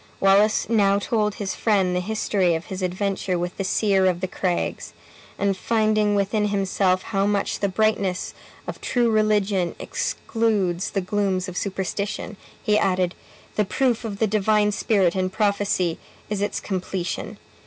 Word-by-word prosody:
Wallace 200 +2 +4
now 200 -3 +3
told 210 0 0
his 195 -2 -3
friend 195 -5 +1
the - - +2
history 190 -3 +1
of 160 - -4
his 190 - -5
adventure 185 0 -1
with 175 +1 -3
the 195 - -1
seer 195 0 +2
of 180 -2 +1
the 185 - -2
craigs, 180 -1 -2 0.4
and 200 -1 +1
finding 215 0 +1
within 210 +1 +1
himself 195 -2 +1
how 195 -2 0
much 205 -1 0
the 200 - 0
brightness 200 -2 0 0.3
of - - -7
true 240 -2 +1
religion 210 -4 +1
excludes 210 -6 -1
the 195 - -1
glooms 190 -1 -1
of 185 - -7
superstition, 200 +3 -3 0.3
he 210 0 +3
added, 185 -2 +1 0.4
"The 210 - +4
proof 240 +3 0
of 210 -3 -4
the 220 - +2
Divine 210 0 +2
Spirit 200 -5 +2
in 185 -1 0
prophecy 200 -4 0 0.3
is 205 -1 -1
its 205 - -1
completion. 185 -2 -4
200 Hz, 155 wpm, -23 LUFS, 185-210 Hz, 0.4 s, Wallace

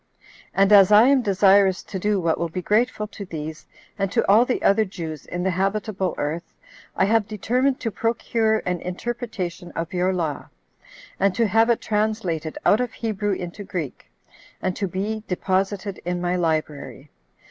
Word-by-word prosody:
And 195 +1 +3
as 195 -1 +7
I 210 +1 +8
am 275 -2 +4
desirous 195 -2 +4
to 190 - -6
do 205 +1 +1
what 165 -2 0
will 170 - -1
be 180 +3 -5
grateful 215 +2 +1
to 205 - -8
these, 155 -3 -7 0.3
and 195 -1 0
to 230 - +1
all 215 +5 +6
the 250 - -2
other 210 +2 +4
Jews 165 -6 -7
in 180 0 -4
the 190 - +1
habitable 195 +1 -1
earth, 155 +4 -4 0.4
I 190 - +3
have 215 0 +2
determined 250 +5 0
to 225 - -2
procure 225 0 0
an 180 -1 -1
interpretation 185 -3 -5
of 165 +1 -4
your 180 +1 +1
law, 165 -6 -3 0.7
and 195 -2 +2
to 230 - +2
have 225 +3 +3
it 235 - +2
translated 210 -7 -1
out 215 - +4
of 245 -2 -3
Hebrew 210 -3 -2
into 180 +2 -6
Greek, 170 -8 -6 0.5
and 185 -1 -2
to 195 - -2
be 205 +5 -3
deposited 195 +2 -1
in 175 +1 -2
my 175 0 0
library. 155 -4 -2
195 Hz, 170 wpm, -23 LUFS, 180-215 Hz, 0.7 s, I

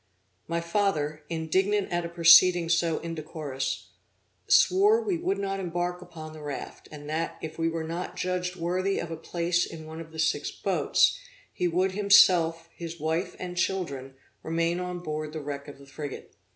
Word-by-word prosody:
My 170 0 -1
father, 165 -4 0
indignant 190 +5 0
at 175 0 0
a - - -4
proceeding 170 0 +6
so 165 -1 +2
indecorous, 155 -4 -4 0.6
swore 410 +4 +5
we 400 -7 -1
would 370 +3 0
not 195 0 -2
embark 175 0 -2
upon 160 -3 -10
the 155 - -10
raft, 145 -2 -7
and 145 -1 -9
that, 160 +2 -2
if 160 +1 -7
we 165 0 +2
were 165 0 -3
not 170 +3 -5
judged 180 0 -2
worthy 185 +3 -1
of 170 - -4
a - - -3
place 170 +2 0
in 160 -1 -7
one 160 +1 -8
of 160 -1 -11
the 160 - -11
six 155 - +1
boats, - - +2 0.3
he 180 - 0
would 180 +3 +1
himself, 180 -5 +5
his 170 -1 -7
wife 160 +4 -1
and 180 -1 -6
children, 140 -8 -2 0.3
remain 165 +2 0
on 180 -1 -4
board 155 -2 -4
the 160 - -4
wreck 145 -1 -6
of 145 - -10
the 140 - -15
frigate. 145 0 -8
170 Hz, 175 wpm, -27 LUFS, 155-180 Hz, 0.6 s, proceeding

